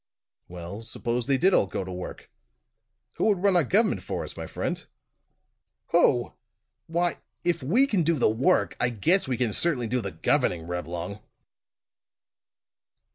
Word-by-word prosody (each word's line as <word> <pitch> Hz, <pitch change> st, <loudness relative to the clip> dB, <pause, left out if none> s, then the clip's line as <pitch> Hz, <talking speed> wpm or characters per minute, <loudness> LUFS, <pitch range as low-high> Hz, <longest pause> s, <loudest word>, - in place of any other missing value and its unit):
"Well, 90 Hz, +4 st, -7 dB
suppose 120 Hz, +1 st, -3 dB
they 135 Hz, -1 st, +3 dB
did 185 Hz, +7 st, +3 dB
all 100 Hz, -, +4 dB
go 95 Hz, -, -3 dB
to 95 Hz, -, -7 dB
work; 90 Hz, 0 st, -8 dB, 0.9 s
who -, -, +1 dB
would 200 Hz, -4 st, +2 dB
run 200 Hz, -2 st, +4 dB
our 175 Hz, -, +5 dB
government 210 Hz, -, +2 dB
for -, -, -4 dB
us, -, -, -8 dB
my -, -, -6 dB
friend?" -, -, -3 dB, 1.1 s
"Who! 130 Hz, -7 st, +3 dB, 0.5 s
Why 170 Hz, +1 st, 0 dB, 0.2 s
if 175 Hz, -2 st, 0 dB
we 205 Hz, -, +3 dB
can 210 Hz, -10 st, +1 dB
do 165 Hz, +1 st, +2 dB
the 125 Hz, -, +3 dB
work, 130 Hz, +12 st, +2 dB
I 120 Hz, -, +2 dB
guess 160 Hz, -, +1 dB
we 130 Hz, -2 st, -1 dB
can 120 Hz, -4 st, 0 dB
certainly 145 Hz, -5 st, +1 dB
do 125 Hz, +2 st, -1 dB
the 100 Hz, -, -3 dB
governing, 80 Hz, 0 st, 0 dB
Reblong." 90 Hz, +3 st, -4 dB
125 Hz, 155 wpm, -26 LUFS, -, 1.1 s, our